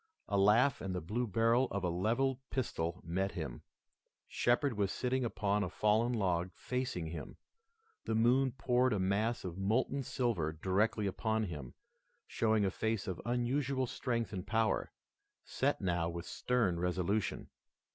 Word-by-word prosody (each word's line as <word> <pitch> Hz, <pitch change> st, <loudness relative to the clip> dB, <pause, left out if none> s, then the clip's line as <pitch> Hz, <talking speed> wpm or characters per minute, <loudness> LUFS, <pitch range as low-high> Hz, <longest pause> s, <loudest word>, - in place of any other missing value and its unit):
A 100 Hz, -, -1 dB
laugh 105 Hz, +7 st, +4 dB
and 95 Hz, -1 st, -3 dB
the -, -, 0 dB
blue 110 Hz, +9 st, -2 dB
barrel 115 Hz, +5 st, +3 dB
of 100 Hz, -1 st, -3 dB
a 90 Hz, -, +1 dB
levelled 120 Hz, +9 st, +1 dB
pistol 90 Hz, -9 st, -2 dB
met 95 Hz, +4 st, -1 dB
him. -, -, -5 dB, 0.7 s
Shepard 125 Hz, +2 st, +2 dB
was 100 Hz, -2 st, 0 dB
sitting 130 Hz, +1 st, 0 dB
upon 105 Hz, -3 st, 0 dB
a 90 Hz, -, -2 dB
fallen 110 Hz, +5 st, +2 dB
log 95 Hz, -6 st, 0 dB
facing 125 Hz, -9 st, -3 dB
him. 80 Hz, -2 st, -7 dB, 0.7 s
The 110 Hz, -, 0 dB
moon 125 Hz, +3 st, +3 dB
poured 125 Hz, -1 st, +2 dB
a 105 Hz, -, 0 dB
mass 105 Hz, +5 st, 0 dB
of 90 Hz, +1 st, -5 dB
molten 120 Hz, +7 st, +1 dB
silver 115 Hz, -12 st, -1 dB
directly 100 Hz, +6 st, +1 dB
upon 110 Hz, +3 st, 0 dB
him, 75 Hz, -, -6 dB, 0.5 s
showing 110 Hz, -2 st, +1 dB
a 95 Hz, -, +1 dB
face 110 Hz, 0 st, -1 dB
of 95 Hz, -2 st, -4 dB
unusual 130 Hz, +2 st, 0 dB
strength 120 Hz, -2 st, -2 dB
and 95 Hz, 0 st, -5 dB
power, 110 Hz, +2 st, +1 dB, 0.5 s
set -, -, 0 dB
now 85 Hz, -3 st, 0 dB
with 85 Hz, 0 st, -5 dB
stern 115 Hz, -9 st, 0 dB
resolution. 90 Hz, +4 st, -1 dB
105 Hz, 150 wpm, -34 LUFS, 95-120 Hz, 0.7 s, laugh